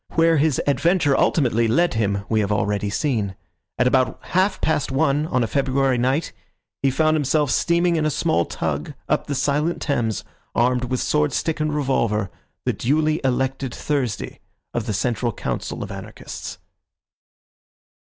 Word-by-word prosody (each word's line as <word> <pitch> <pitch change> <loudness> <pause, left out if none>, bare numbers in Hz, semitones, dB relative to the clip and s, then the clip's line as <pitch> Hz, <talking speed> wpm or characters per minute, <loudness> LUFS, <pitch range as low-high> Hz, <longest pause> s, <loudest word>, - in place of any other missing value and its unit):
Where 165 0 +4
his 145 -2 +2
adventure 145 +1 +2
ultimately 115 -8 +2
led 170 +10 +2
him 100 -3 0
we 110 - +1
have 105 -1 0
already 105 -1 0
seen. 105 -5 -1 0.4
At 125 - +2
about 130 0 +2
half 190 +2 +2
past 160 -3 0
one 145 +2 +1
on 125 -5 +1
a - - 0
February 135 -1 +1
night 130 +6 0 0.5
he 135 - +3
found 155 +4 +2
himself 150 -1 +1
steaming 170 0 +2
in 155 - +1
a - - +2
small 85 - +1
tug 75 -2 -3
up - - 0
the 145 - -2
silent 145 +5 0
Thames, 115 - -1 0.3
armed 125 +1 +2
with 130 0 -1
swordstick 150 +2 0
and 155 0 0
revolver, 115 -9 0 0.3
the - - +1
duly 155 +4 +1
elected 130 0 -1
Thursday 130 -8 -2 0.3
of 120 - -2
the 105 - -1
Central 120 +4 0
Council - - -4
of - - -7
Anarchists. - - -8
135 Hz, 150 wpm, -22 LUFS, 115-155 Hz, 0.5 s, Where